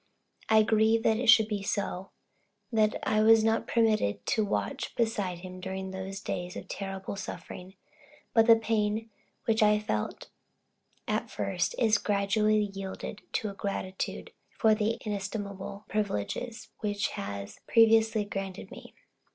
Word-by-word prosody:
I 220 0 +6
grieve 220 +1 +3
that 220 - +3
it 250 - -2
should 220 -1 +8
be 210 -2 -2
so 195 -1 -3 0.6
that 215 -2 +3
I 215 -1 +2
was 220 0 +6
not 225 0 +1
permitted 220 - +1
to 220 - +1
watch 100 - -2
beside 205 -7 -1
him 185 0 -8
during 190 0 -5
those 190 +1 -6
days 180 -2 -4
of 185 - -7
terrible 195 0 -5
suffering; 190 -1 -8 0.6
but 225 0 +5
the 230 - +9
pain, 220 0 -1 0.3
which 225 -1 +2
I 210 0 +6 1.3
at - - -1
first 105 - -1
felt, - - -1
is 215 -1 +4
gradually 210 +1 +1
yielding 195 +1 -6
to 210 -2 -1
gratitude 195 -1 -4 0.2
for 220 -3 +3
the 215 +1 0
inestimable 200 -1 -5
privileges 215 - -3
which 205 -2 -1
had 100 0 -5 0.2
previously 225 -1 +5
been 205 - -13
granted 195 -1 -5
me. - - -12
210 Hz, 140 wpm, -29 LUFS, 195-220 Hz, 1.3 s, the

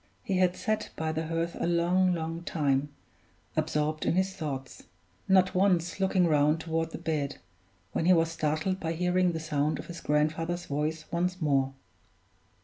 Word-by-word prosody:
He 190 - 0
had 180 -1 +3
sat 215 -1 -1
by 160 0 -1
the 160 0 -3
hearth 165 +1 -2
a - - 0
long, 175 +2 +3
long 165 0 -4
time, 145 -4 0 0.7
absorbed 155 +1 0
in - - +1
his 190 +1 +1
thoughts, 140 -8 -6 0.4
not 185 -1 +4
once 180 -2 +2
looking 190 -1 +3
round 150 0 +3
toward 165 0 -1
the - - -6
bed, 145 -3 -2 0.5
when 165 - -1
he 185 - +7
was 165 -1 +2
startled 155 +4 -1
by 165 -2 -2
hearing 180 +1 +2
the 160 - -2
sound 150 -1 0
of - - -7
his 170 -1 -8
grandfather's 160 +4 0
voice 155 +2 -2
once 180 +2 -1
more. 135 -4 +1
165 Hz, 165 wpm, -29 LUFS, 155-180 Hz, 0.7 s, he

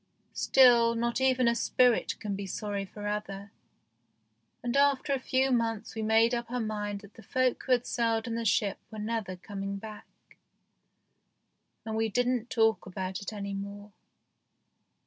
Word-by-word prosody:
Still, 235 -3 +5
not 235 +2 -1
even 255 -2 +3
a 235 - +4
spirit 245 0 +2
can 205 -2 -3
be 195 0 -5
sorry 200 0 -3
for 205 +2 -9
ever, 200 -1 -4 1.1
and 240 +1 -2
after 280 0 +3
a 270 - 0
few 265 +1 +1
months 225 -3 -1
we 220 - -4
made 225 +2 +3
up 235 -1 -2
our 250 +1 -2
mind 210 -2 -3
that 200 -1 -15
the - - -14
folk 255 +2 0
who 260 - +3
had 245 -1 +1
sailed 230 -1 0
in 230 - -3
the 230 0 -2
ship 205 -2 +1
were 220 - -9
never 215 -3 -3
coming 195 +1 -5
back, 215 +1 -9 1.8
and 220 -1 -3
we 225 0 +1
didn't 245 +1 0
talk 225 -3 +2
about 185 0 -4
it 200 - -5
any 200 -2 -5
more. 200 +1 -7
225 Hz, 165 wpm, -29 LUFS, 205-240 Hz, 1.8 s, Still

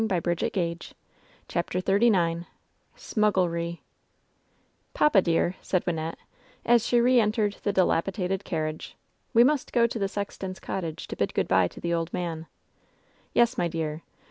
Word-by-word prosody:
LOVE'S 220 - 0
BITTEREST 175 -1 -1
CUE 190 - +1
889 170 +1 -9 0.2
CHAPTER 170 +1 -2
XXXIX 185 -4 +2 0.5
"SMUGGLEEy 175 -5 0 1.2
''Papa, 235 -10 +5
dear/' 170 +1 +1
said 185 - -1
Wynnette 165 -2 -2 0.5
as 235 -1 +4
she 240 - +3
re 250 +1 +5
entered 210 -2 +1
the 205 - 0
di 190 -1 +3
lapidated 185 +3 -1
carriage, 155 -4 -4 0.4
'Ve 235 - +8
must 285 +1 +1
go 235 -1 +4
to 235 -1 -2
the 195 - +1
sexton's 195 -2 -5
cottage 165 -5 -5
to - - -6
bid - - -2
good - - +1
by 95 -1 +4
to - - -12
the 170 0 -2
old 165 0 -1
man." 165 -2 -4 0.9
"Yes, 235 +1 +3
my 175 - +2
dear. 160 -1 -3
185 Hz, 155 wpm, -26 LUFS, 170-215 Hz, 1.2 s, Ve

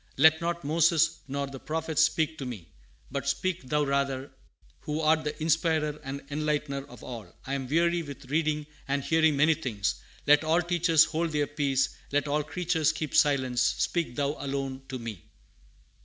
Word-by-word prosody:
Let 160 +3 +6
not 170 0 -2
Moses 165 +2 +3
nor 140 +1 -2
the 135 -1 -8
prophets 160 +1 -1
speak 160 0 +1
to 135 - -4
me, 105 -9 -8 0.4
but - - -3
speak 185 -1 -1
thou 150 +1 +2
rather, 140 -1 -1 0.5
who 150 +1 -3
art 155 0 +3
the 150 - -4
Inspirer 155 -1 +1
and 135 +1 -6
Enlightener 145 -2 -1
of 125 - -13
all. 110 -7 -8
I 135 - -3
am 135 -2 -2
weary 170 +4 +2
with 140 -3 -9
reading 155 -1 +1 0.2
and 140 0 0
hearing 160 -1 +3
many 155 +3 +5
things; 115 -10 -2 0.2
let 150 +1 +6
all 165 +3 +2
teachers 170 -2 +4
hold 165 0 -2
their 150 -1 +2
peace; 140 -2 0 0.2
let 145 0 +1
all 150 +1 +1
creatures 160 0 0
keep 155 -2 -5
silence: 130 -4 +3
speak 155 +1 0
thou 140 +1 0
alone 135 -1 -3
to 130 - -4
me." 115 -7 -7
150 Hz, 170 wpm, -28 LUFS, 140-160 Hz, 0.5 s, Let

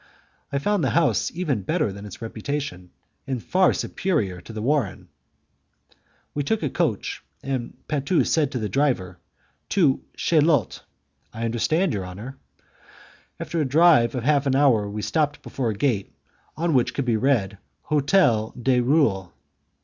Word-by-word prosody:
I 140 - 0
found 200 +5 0
the - - +2
house 150 - +2
even 155 - -1
better 150 - -1
than 100 +1 -9
its 100 +3 -10
reputation, 110 -5 -4 0.4
and 135 -2 -1
by - - -15
far 185 0 +4
superior 105 - -1
to 100 - -11
the 110 -1 -5
warren. 135 -6 -1 1.2
We 145 - -1
took 205 +7 -1
a 145 - -1
coach, - - -1 0.2
and 130 -3 -4
Patu 150 +3 +1
said 150 -4 +1
to 130 - -3
the 110 -3 -2
driver, 100 -8 0 0.5
"To 160 -9 +2
Chaillot." 155 -5 +2 0.5
"I 115 -1 -4
understand, 155 - +1
your 95 -3 -3
honour." 105 +9 -8 1.0
After 165 - -2
a - - +2
drive 140 -4 +4
of 125 - -3
half 145 +1 +2
an 135 - +2
hour, 125 -8 +3
we 105 +1 -5
stopped 145 +7 0
before 125 -4 -2
a 110 - -2
gate 110 -5 0 0.5
on 165 0 0
which 125 -3 +2
could 140 - -1
be 120 -2 +2
read, 110 -6 +1 0.2
"Hotel 140 - +2
du 125 0 +2
Roule." 120 - +2
130 Hz, 155 wpm, -24 LUFS, 110-150 Hz, 1.2 s, far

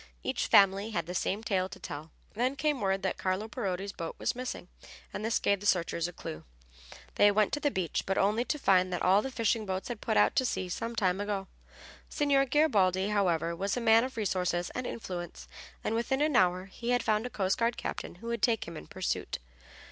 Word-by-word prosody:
Each - - -1
family 195 +2 +5
had 170 -7 -2
the 175 - -5
same 195 +4 -1
tale 190 -4 0
to 195 - -9
tell. 155 -2 -7 0.2
Then 250 +5 0
came 295 -3 0
word 195 -1 0
that 190 - -1
Carlo 190 +3 -1
Parodi's 200 -4 -3
boat 165 -4 -6
was - - 0
missing, 250 -7 -5 0.5
and 205 - -4
this 225 0 +1
gave 200 -1 +1
the 205 - -3
searchers 170 -2 +1
a - - -7
clue. 80 - -7 0.7
They 205 - +7
went 205 0 +2
to 295 - 0
the 290 - +1
beach, 185 - -1
but 195 - 0
only 210 +4 +2
to 300 - -1
find 185 -8 +3
that 180 - -2
all 190 +3 +5
the 270 - -4
fishing 230 -3 0
boats 190 +1 -3
had 235 -3 -5
put - - 0
out 105 0 +4
to - - +4
sea 185 -7 -2
some 230 +6 -4
time 190 -3 +1
ago. 200 -2 -2 0.6
Signor 280 -2 +2
Garibaldi, 205 - +3
however, 170 -5 +1
was 195 +6 -1
a - - +1
man 225 -1 +5
of 255 -2 -5
resource 185 -5 0
and 210 +8 -3
influence, 175 -6 -6 0.4
and - - -1
within 250 +4 0
an 300 -2 +2
hour 185 -1 +3
he 235 +5 -6
had 245 -1 +2
found 215 +2 +1
a - - -8
coast 195 -4 0
guard 235 0 +1
captain - - -5
who 180 - -13
would 235 -2 -2
take 225 -1 +2
him 170 - -7
in 75 - -9
pursuit. - - -3
200 Hz, 220 wpm, -30 LUFS, 185-235 Hz, 0.7 s, They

